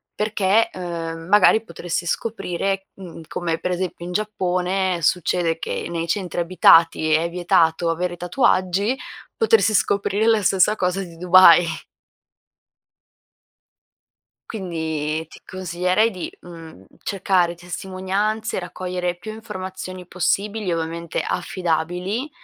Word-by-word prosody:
perché, 210 0 +2
uhm, 165 -2 -5
magari 210 +2 +5
potresti 170 -2 -4
scoprire 195 -1 -2
mhmm, 180 -4 -10
come 165 -2 -2
per 180 - -2
esempio 180 -1 -3
in 180 - -6
Giappone 185 -2 -1
succede 165 0 +1
che - - -4
nei 170 -1 -3
centri 180 0 -2
abitati 165 -2 +4
è 165 +2 +2
vietato 170 -1 +2
avere 175 +1 -2
tatuaggi, 185 +3 +1 0.4
potersi 450 - +3
scoprire 200 +1 +1
la 225 -2 +4
stessa 195 +3 +3
cosa 185 -1 -1
di 170 -2 -11
Dubai. 175 0 +7 2.8
Quindi 160 -5 -3
ti - - -15
consiglierei 185 +4 0
di, 185 -3 -6
mhmm, 165 - -12 0.2
cercare 185 -3 +1
testimonianze, 190 +5 -3
raccogliere 180 0 -4
più 200 +5 -8
informazioni 185 -4 -7
possibili, 195 +3 -1
ovviamente, 165 0 -3
affidabili, 180 - -2
180 Hz, 105 wpm, -22 LUFS, 170-195 Hz, 2.8 s, Dubai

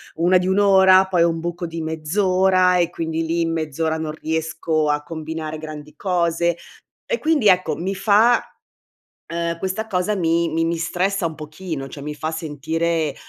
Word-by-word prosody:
1 175 +3 +4
di 180 0 -1
1 190 +2 +2
ora, 190 -1 +6
poi 180 -3 +2
ho 170 - +4
un 165 0 -3
buco 175 +1 -4
di 165 0 -5
mezz'ora, 185 +3 +2
e 175 -1 +2
quindi 165 -1 -3
lì, 165 +1 0
in 165 0 0
mezz'ora 160 0 -2
non 160 -1 -4
riesco 160 0 -1
a 150 0 0
combinare 155 0 -5
grandi 155 -1 -9
cose, 170 -2 0 0.5
e - - -1
quindi, 305 -8 +1
ecco, 180 -5 +3
mi 190 +3 -3
fa 210 +5 +3 0.9
uhm, 170 0 -2
questa 190 +5 -3
cosa 200 0 0
mi 170 -2 +1
mi 165 0 0
mi 165 +1 0
stressa 180 +3 -1
un 160 - -4
pochino, 155 -1 -6
cioè, 140 - -9
mi 150 +1 -5
fa 155 +1 -3
sentire, 160 0 -2
170 Hz, 175 wpm, -21 LUFS, 160-185 Hz, 0.9 s, ora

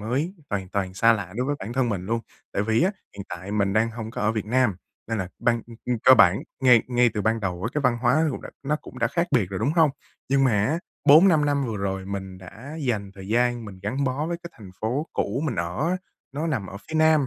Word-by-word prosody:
mới, 135 - -2 0.2
hoàn 95 -3 -2
toàn 95 -1 -2
xa 115 +4 +5
lạ 100 -4 -3
đối 125 +1 -1
với 145 - 0
bản 110 +5 -6
thân 130 -2 +1
mình 95 -3 -3
luôn. 115 +1 0 0.3
Tại 100 - 0
vì 110 +6 +2
á, 190 - +3 0.3
hiện 100 - -6
tại 90 +3 -7
mình 100 -2 +1
đang 110 +2 +2
hông 110 -1 -6
có - - -6
ở 110 +1 +2
Việt 110 -2 -3
Nam 120 -4 +2 0.3
nên 115 -2 -1
là 95 - -3
ban, 120 -1 +1
ưm, 115 - -12
ưm 125 -2 -1
cơ 130 - +9
bản 90 -2 +5 0.2
ngay 125 -4 +6
ngay 125 -1 +3
từ 105 - -1
ban 115 0 +1
đầu 90 -4 -3
với 115 +6 -2
cái 150 - +1
văn 125 -3 +2
hóa 130 +6 +3
cũng - - -5
đã - - -8
nó 150 +2 0
cũng 130 - -12
đã 115 - +2
khác 170 +7 0
biệt 110 -9 +2
rồi, 95 - -3
đúng 125 +7 +1
không? 160 -3 +4 0.4
Nhưng 135 0 +3
mà 105 -5 +3
á, 155 +7 0 0.3
4-5 155 +1 +7
năm 145 -1 +1
vừa 110 - -3
rồi 95 -1 -3
mình 95 -1 -6
đã 115 - -10
dành 110 -7 -1
thời 95 -1 -10
gian 120 +1 +1
mình 100 -3 -10
gắn 130 +7 -1
bó 135 +4 -1
với 170 +1 -2
cái 170 - -8
thành 100 -4 -11
phố 125 +8 -1
cũ 120 +8 -1
mình 135 - -1
ở 90 - -1
á, 185 - +1 0.4
nó 150 +4 -2
nằm 130 -12 -1
ở 100 - -8
phía - - -7
Nam, 155 -3 +4
115 Hz, 270 wpm, -25 LUFS, 100-140 Hz, 0.4 s, cơ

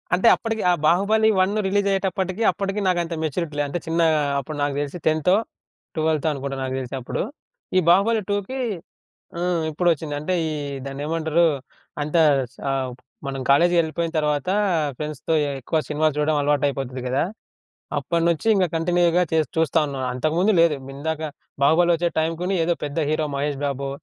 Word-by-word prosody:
అంటే, 190 +6 +2
అప్పడికి 225 -1 -3
ఆ - - +4
బాహుబలి 205 +6 +4
1 205 +3 0
రిలీజ్ 200 +1 +1
అయ్యేటప్పటికి, 190 +1 -1
అప్పటికి 195 +1 -3
నాకంత 175 -2 0
మెచ్యూరిటీ 155 0 -2
లేదు. 145 0 0
అంటే 175 - -2
చిన్నగా 165 -1 +3 0.2
అప్పుడు 145 +3 -6
నాకు 145 -1 0
తెలిసి 145 +3 -4
10థో, 155 +4 +3 0.6
12థో 155 -1 +1
అనుకుంటా, 135 -1 -4
నాకు 130 0 -3
తెలిసి 130 0 -5
అప్పుడు. 120 - -3 0.6
ఈ - - +7
బాహుబలి 210 +5 +4
2కి 205 +6 -2 0.8
హ్మ్. 175 -1 0
ఇప్పుడొచ్చింది. 160 -2 0
అంటే 185 +5 -1
ఈ - - -3 0.4
దాన్నేమంటారు? 160 +4 0 0.6
అంత 150 +3 -1 0.4
సా 140 - -3 0.6
మనం 135 -1 -4
కాలేజీకెళ్ళిపోయిన 170 +2 +3
తర్వాత, 150 0 0 0.5
ఫ్రెండ్స్‌తో 150 +2 -3 0.3
ఎక్కువ 160 +6 -1
సినిమాలు 155 +1 +1
జూడడం 150 +1 +1
అలవాటయిపోతది 140 -3 0
గదా! 130 +4 +1 0.7
అప్పడినుంచి 170 +1 0
ఇంగ 195 -2 +3
కంటిన్యూగా 175 +1 +2
చేస్ 160 -1 +2
చూస్తా 160 0 +2
ఉన్నాను. 135 -2 -3
అంతకుముందు 160 +10 +1
లేదు. 165 -2 +4 0.2
ఇందాక 160 +3 -3 0.4
బాహుబలి 170 +5 +5
ఒచ్చే 170 +1 +1
టైం 160 +1 +1
గుని 185 +2 0
ఏదో 175 - +2
పెద్ద 145 +1 -4
హీరో 155 0 0
మహేష్ 140 0 -2
బాబో, 140 -1 -2
160 Hz, 145 wpm, -23 LUFS, 145-175 Hz, 0.8 s, ఈ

